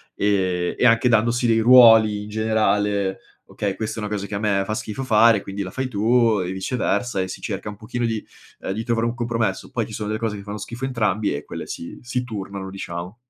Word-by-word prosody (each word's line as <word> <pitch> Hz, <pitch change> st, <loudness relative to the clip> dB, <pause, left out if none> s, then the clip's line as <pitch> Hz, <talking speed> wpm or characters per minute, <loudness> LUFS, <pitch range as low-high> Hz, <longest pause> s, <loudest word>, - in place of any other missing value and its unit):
e 95 Hz, -3 st, 0 dB
e -, -, +2 dB
anche 115 Hz, +1 st, +5 dB
dandosi 120 Hz, +2 st, +2 dB
dei 115 Hz, 0 st, +3 dB
ruoli 110 Hz, -4 st, +7 dB
in 105 Hz, -, -9 dB
generale: 105 Hz, -2 st, 0 dB, 0.3 s
"Okay, 100 Hz, -2 st, -3 dB
questa 110 Hz, 0 st, -4 dB
è -, -, -3 dB
una 105 Hz, -, -4 dB
cosa 100 Hz, -1 st, -2 dB
che 100 Hz, -, -5 dB
a -, -, -2 dB
me 100 Hz, -2 st, +1 dB
fa 110 Hz, -, -3 dB
schifo 110 Hz, +5 st, -5 dB
fare, 115 Hz, -2 st, +5 dB
e -, -, -5 dB
quindi 100 Hz, +1 st, -5 dB
la 95 Hz, -, -7 dB
fai 130 Hz, -1 st, -3 dB
tu, 115 Hz, -1 st, +2 dB
e 90 Hz, -, -4 dB
viceversa" 100 Hz, +2 st, -1 dB
e 95 Hz, -, -2 dB
si -, -, -7 dB
cerca 105 Hz, -1 st, -4 dB
un 105 Hz, -, -8 dB
pochino 120 Hz, +3 st, -3 dB
di 110 Hz, -2 st, -2 dB, 0.4 s
uhm, -, -, -4 dB
di 110 Hz, +3 st, -3 dB
trovare 115 Hz, 0 st, 0 dB
un 120 Hz, -, -3 dB
compromesso, 115 Hz, -4 st, -2 dB
poi -, -, -2 dB
ci -, -, -10 dB
sono 105 Hz, -1 st, -4 dB
delle 110 Hz, +1 st, -2 dB
cose 110 Hz, -3 st, -2 dB
che 100 Hz, -, -9 dB
fanno 105 Hz, +1 st, -6 dB
schifo 120 Hz, +5 st, -8 dB
a -, -, +1 dB
entrambi 110 Hz, -, 0 dB
e 70 Hz, -, -5 dB
quelle -, -, -7 dB
si 85 Hz, -, -7 dB
si 125 Hz, +1 st, -2 dB
turnano, 100 Hz, -4 st, -6 dB
diciamo. 90 Hz, 0 st, -6 dB
110 Hz, 240 wpm, -22 LUFS, 100-115 Hz, 0.4 s, ruoli